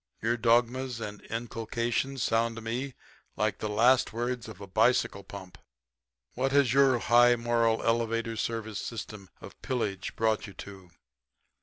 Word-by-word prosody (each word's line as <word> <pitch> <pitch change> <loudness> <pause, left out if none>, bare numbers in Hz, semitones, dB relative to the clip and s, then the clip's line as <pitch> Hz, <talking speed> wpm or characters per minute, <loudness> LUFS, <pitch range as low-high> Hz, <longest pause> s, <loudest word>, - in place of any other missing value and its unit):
Your 115 +1 +2
dogmas 120 +2 +1
and 105 -2 -6
inculcations 120 +3 -2
sound 115 0 +1
to 115 - -7
me 125 +4 -4 0.4
like 105 +1 0
the 105 - -3
last 120 +5 +4
words 120 0 -3
of 110 -4 -10
a 100 - -8
bicycle 110 0 +2
pump. 95 -2 -11 0.7
What 135 +2 -1
has 140 -4 +4
your 135 -2 +5
high 120 +1 +5
moral, 115 -1 +1
elevator 115 0 0
service 110 -2 -3
system 105 -4 -7
of - - -12
pillage 105 -7 -3
brought 110 -1 0
you 100 - -12
to? 95 -2 -11
115 Hz, 145 wpm, -29 LUFS, 110-120 Hz, 0.7 s, your